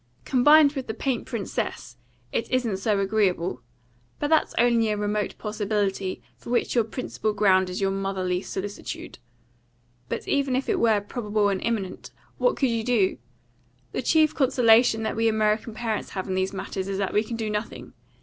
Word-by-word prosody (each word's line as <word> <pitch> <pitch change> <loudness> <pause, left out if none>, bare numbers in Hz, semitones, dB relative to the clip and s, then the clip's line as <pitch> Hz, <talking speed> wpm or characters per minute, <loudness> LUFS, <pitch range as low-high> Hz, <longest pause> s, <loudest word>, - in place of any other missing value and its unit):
Combined 295 +3 +6
with 270 -3 -5
the 220 - -4
paint 255 0 -2
princess, 200 - -4 0.4
it 230 - -2
isn't 240 -6 0
so 200 +1 0
agreeable; 190 - 0 0.6
but 290 - -2
that's 315 -1 +2
only 235 -2 +3
a 210 - 0
remote 210 0 -2
possibility, 205 -3 -2
for - - -12
which 240 - +1
your 235 - +3
principal 220 -1 -3
ground 190 -3 +3
is 180 - -4
your 195 0 +2
motherly 190 -2 -1
solicitude. 200 +1 -6 0.9
But - - -4
even 275 -2 +1
if 265 - -1
it - - +1
were 220 -3 +3
probable 210 -1 -1
and 195 -1 -1
imminent, 210 -5 -3 0.3
what - - +3
could 270 - +2
you 230 -1 -1
do? 220 -6 +1 0.7
The - - -2
chief 310 +4 +3
consolation 240 -4 +4
that 220 - -2
we 225 +1 +2
American 215 0 +1
parents 220 -2 -3
have 190 - -3
in 190 - -2
these 190 0 0
matters 190 0 -4
is 195 -1 -2
that 195 -1 -2
we 210 - +3
can 230 +1 -5
do 220 -1 -2
nothing. 210 +1 -5
215 Hz, 175 wpm, -25 LUFS, 195-235 Hz, 0.9 s, Combined